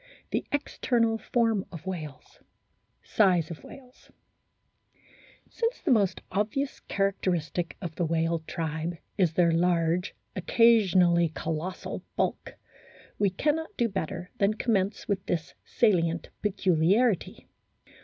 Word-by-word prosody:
THE - - 0
EXTERNAL 235 -5 0
FORM 225 -5 +1
OF 165 -2 -9
WHALES 155 -7 -7 0.6
SIZE 180 -6 +2
OF 160 - -8
WHALES 255 -1 -14 1.4
SINCE 465 +1 -2
the 335 - +2
most 205 -6 +2
obvious 215 +8 -1
characteristic 175 -4 -1
of 170 -3 -4
the 175 - -1
whale 165 +1 +1
tribe 160 +1 -3 0.2
is 175 -4 +3
their 170 0 +4
large, 170 +1 +1 0.2
occasionally 185 -5 +4
colossal, 165 +3 -4
bulk, - - -2 0.6
we 205 - +3
cannot 310 - -1
do 235 - +2
better 180 -3 -4
than 200 +1 +3
commence 210 -3 0
with 195 -2 -1
this 165 -2 -2
salient 170 -7 +1
peculiarity. 195 +2 +1
185 Hz, 110 wpm, -28 LUFS, 170-220 Hz, 1.4 s, their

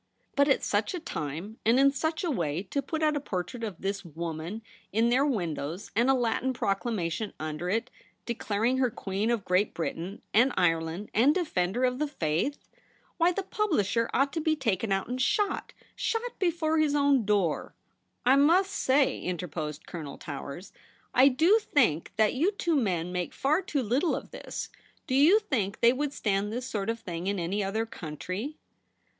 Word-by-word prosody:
' - - -41
But 280 0 +4
at 275 - +3
such 210 - 0
a - - -3
time; 170 - -5
and 235 +4 +4
in 275 0 +6
such 315 +4 -2
a 345 - 0
way, 170 - -1
to 280 - +1
put 315 +3 -3
out 305 -1 +3
a - - +1
portrait 230 0 -4
of 205 -6 -4
this 200 +1 -2
w^oman 170 +3 -5 0.3
in 225 +3 +3
their 255 +3 +4
windows, 170 - -3
and 240 +3 +3
a 270 - +5
Latin 245 +1 0
proclamation 200 -3 -1
under 155 +3 -3
it) 225 +5 -1 0.3
declaring 235 +2 0
her 255 -2 +3
Queen 200 0 -2
of 230 -5 0
Great 185 +3 +1
Britain 175 +4 -4
and 245 +5 +5
Ireland 165 +2 0
and 265 +7 +4
Defender 245 - 0
of 250 0 +1
the 300 - +1
Faith! 170 - -1 0.6
Why 340 +1 +4
the 390 +2 -2
publisher 235 - 0
ought 275 +1 +1
to 325 - -1
be 315 0 +2
taken 225 -7 -1
out 195 0 0
and 250 +2 -3
shot 405 +9 0 0.2
— - - -33
shot 470 +1 -2
before 320 -3 +1
his 300 -2 +2
own 280 -3 +4
door.' 200 -6 0 0.3
' - - -44
I 260 +2 +6
must 350 +7 +4
say,' 270 -4 +2
interposed 155 -4 -4
Colonel 155 -5 -7
Towers, 140 +5 -7 0.2
' - - -33
I 260 +2 +7
do 325 - +5
think 235 - +1
that 215 0 +3
you 335 +11 +1
two 340 -4 0
men 180 - 0
make 180 -1 -3
far 305 +6 +2
too 295 -7 -1
little 260 - +1
of - - -7
this. - - -6 0.4
Do 255 - -3
you 300 +10 +6
think 240 - -1
they 235 +1 +6
would 285 +2 -1
stand 205 -5 -1
this 245 +3 -3
sort 210 -4 -3
of 230 0 -1
thing 175 -4 -5
in 200 0 0
any 190 +4 -1
other 215 +4 -1
country 185 - -6
230 Hz, 190 wpm, -28 LUFS, 185-280 Hz, 0.6 s, I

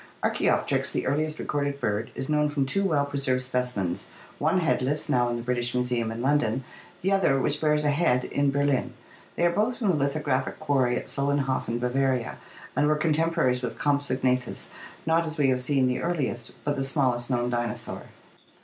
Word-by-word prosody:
— - - -30
Archaopteryx, - - +1
the - - -2
earliest 155 +3 0
recorded 140 -1 -2
bird, 105 -2 -1
is 135 - -3
known 150 0 +2
from 145 -2 0
two 195 +9 0
well 155 -7 +2
preserved 135 -2 0
specimens, 125 -8 -2 0.3
one 165 +5 +2
headless, 150 -2 0
now 120 -1 +2
in 120 - -1
the 120 - -4
British 120 0 -1
Museum 125 -2 0
in 115 +2 -5
London, 135 -3 +1 0.4
the 190 - +1
other, 180 -9 +3
which 145 +2 0
bears 150 -1 +2
a 145 - +4
head, 145 -5 +2
in 140 0 +1
Ber 140 +1 +1
lin. 130 -3 0 0.4
They 170 - +2
are 175 - +4
both 220 +7 0
from 215 -5 0
the 180 - +3
lithographic 140 -2 -1
quarry 135 -5 +2
at - - -3
Solenhofen, 140 -4 0
Bavaria, 125 0 0 0.4
and 150 - +3
were 155 - +3
contemporaries 155 -4 +1
with 125 -2 -4
Compsognathus, 130 -3 0 0.3
not, 165 +1 +3
as 160 +1 -5
we 140 -3 +3
have 130 -1 +1
seen, 135 0 +2
the 125 0 0
earliest, 140 -9 -2
but 145 -1 -1
the 135 - 0
smallest 130 -3 +1
known 120 -1 0
dinosaur. 120 -2 -3
135 Hz, 185 wpm, -26 LUFS, 125-150 Hz, 0.4 s, a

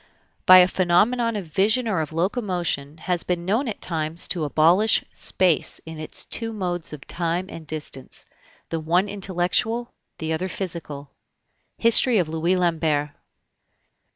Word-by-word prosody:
by 185 - +10
a 180 -1 +7
phenomenon 215 +7 +2
of 200 -3 -4
vision 210 +9 +1
or 190 -7 0
of 155 - -5
locomotion 175 - -2
has 175 +1 -2
been 175 -1 -3
known 225 +9 0
at 220 - -5
times 160 0 -2
to 170 -4 -2
abolish 170 +9 +4
Space 180 -5 +1
in 160 -1 -9
its 155 - -4
two 225 -1 -3
modes 180 -5 -4
of 150 -2 -10
Time 170 +1 -2
and 160 -2 -10
Distance 150 -3 -6 0.4
the 165 - -2
one 175 +5 +1
intellectual, 195 +4 -1 0.2
the 160 0 -3
other 180 +4 -3
physical. 160 -7 -6 0.7
HISTORY 230 +1 +6
OF 175 -5 0
LOUIS 165 +3 0
LAMBERT. 160 -4 0
175 Hz, 145 wpm, -23 LUFS, 160-195 Hz, 0.7 s, by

